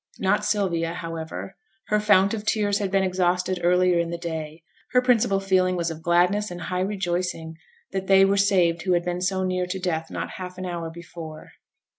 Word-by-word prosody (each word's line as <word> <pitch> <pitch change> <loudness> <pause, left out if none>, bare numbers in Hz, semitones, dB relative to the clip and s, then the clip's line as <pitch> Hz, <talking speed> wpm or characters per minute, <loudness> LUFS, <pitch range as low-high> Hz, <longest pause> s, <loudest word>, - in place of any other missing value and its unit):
Not 205 +2 +1
Sylvia, 175 -6 0
however; 165 +2 -6 0.3
her 210 - +3
fount 200 -1 +4
of 215 -2 -3
tears 205 -1 +1
had 200 -2 -1
been 195 0 +2
exhausted 180 0 0
earlier 180 0 +3
in 170 0 -1
the 170 - -3
day: 160 -1 -6 0.3
her 250 - +5
principal 235 -5 +3
feeling 185 -1 +2
was 170 -1 -1
of 160 0 -8
gladness 180 +5 +2
and 175 0 -7
high 180 +2 -2
rejoicing 180 -4 -2 0.4
that 190 0 -3
they 195 0 +6
were 195 +1 +2
saved 180 -4 +3
who 185 0 +1
had 175 0 +2
been 180 0 -2
so 190 +1 0
near 185 -1 -1
to 185 +2 -3
death 165 -3 -2
not - - -4
half 180 -1 -7
an 185 - -5
hour 170 -2 -4
before. 165 -1 -10
180 Hz, 195 wpm, -24 LUFS, 170-195 Hz, 0.4 s, they